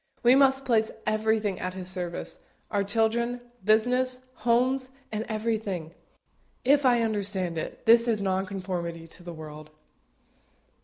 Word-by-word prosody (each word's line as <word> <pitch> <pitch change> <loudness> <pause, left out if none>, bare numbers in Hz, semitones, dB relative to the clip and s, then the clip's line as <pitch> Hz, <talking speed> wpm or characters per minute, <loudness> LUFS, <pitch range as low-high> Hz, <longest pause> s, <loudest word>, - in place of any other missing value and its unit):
We 245 +1 +7
must 270 0 +4
place 220 -3 +2 0.2
everything 215 -2 +1
at 185 0 -4
His 185 -1 -5
service 180 -2 -3 0.3
our 200 -2 +1
children, 230 +4 0 0.2
business, 250 +5 +3 0.2
homes, 255 +2 +1 0.2
and 215 +1 -3
everything. 215 -7 -2 0.7
If 280 +1 +5
I 240 -2 +4
understand 200 -5 0
it, - - -7
this 230 +1 +6
is 225 -3 +2
nonconformity 185 -3 -3
to 175 - -11
the 175 0 -8
world. 155 -1 -9
215 Hz, 125 wpm, -27 LUFS, 185-235 Hz, 0.7 s, We